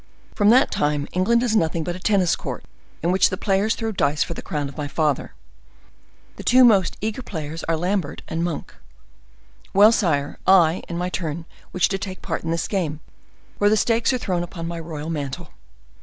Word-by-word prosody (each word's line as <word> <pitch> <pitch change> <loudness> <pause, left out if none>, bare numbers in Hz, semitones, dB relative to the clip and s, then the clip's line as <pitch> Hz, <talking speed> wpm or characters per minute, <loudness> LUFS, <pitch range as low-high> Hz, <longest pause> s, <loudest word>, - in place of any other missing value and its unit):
"From 205 -1 +3
that 255 +4 +5
time 145 -1 0
England 235 +6 +2
is 230 -3 +1
nothing 165 -4 +1
but 175 +2 -3
a - - -8
tennis 190 -3 +2
court, - - -6 0.4
in 170 - +2
which 190 - +4
the 185 - -4
players 200 +3 +1
throw 225 -1 -3
dice 150 -7 +1
for - - -5
the - - -7
crown 145 -2 -3
of 140 - -10
my 145 -1 -4
father. 150 -1 -1 1.0
The - - -8
two 255 +1 +6
most 200 -7 +4
eager 220 +4 -3
players 160 - -6
are 165 -1 0
Lambert 180 -2 -2
and 165 +1 -2
Monk. 170 -3 -4 1.0
Well, 205 +3 +8
sire, 145 -10 0
I, 175 -3 +5
in 170 - -3
my 180 +1 -2
turn, 165 -2 -4 0.3
wish 185 - +2
to 195 - -2
take 190 -1 -7
part 165 -4 -3
in 165 - -4
this 165 0 -1
game, 165 -7 -2 0.6
where 205 - +4
the 215 - +3
stakes 230 +3 +2
are 255 - +1
thrown 185 -7 -2
upon 175 -1 -6
my 170 0 -4
royal 160 -1 -6
mantle. 140 -4 -5
175 Hz, 200 wpm, -22 LUFS, 160-205 Hz, 1.0 s, Well